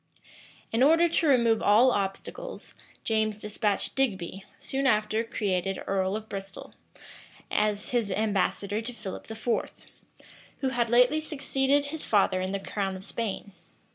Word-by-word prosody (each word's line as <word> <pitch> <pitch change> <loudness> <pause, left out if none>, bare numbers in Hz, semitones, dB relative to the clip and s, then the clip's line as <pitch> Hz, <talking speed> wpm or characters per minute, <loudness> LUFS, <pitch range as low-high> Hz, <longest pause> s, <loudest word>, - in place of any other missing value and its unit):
In 230 - +1
order 325 +5 +6
to 330 -1 +1
remove 235 -5 +4
all 230 +5 +5
obstacles, 225 - -4 0.3
James 215 -1 +1
despatched 210 -1 -1
Digby, 195 -7 -1
soon 270 0 -1
after 215 -1 +2
created 195 -4 -1
earl 190 0 0
of 220 0 -5
Bristol, 195 -1 -7 0.8
as 210 0 0
his 235 -4 +1
ambassador 205 0 0
to 245 +2 -6
Philip 215 -3 -8
IV., 225 +2 -1 0.9
who 265 - +1
had 240 -2 0
lately 250 +6 +5
succeeded 285 -2 +1
his 305 +2 -4
father 195 -3 +2
in 185 - -2
the 200 +1 -2
crown 195 -1 -3
of 185 - -8
Spain. 205 -2 -4
220 Hz, 140 wpm, -28 LUFS, 200-255 Hz, 0.9 s, order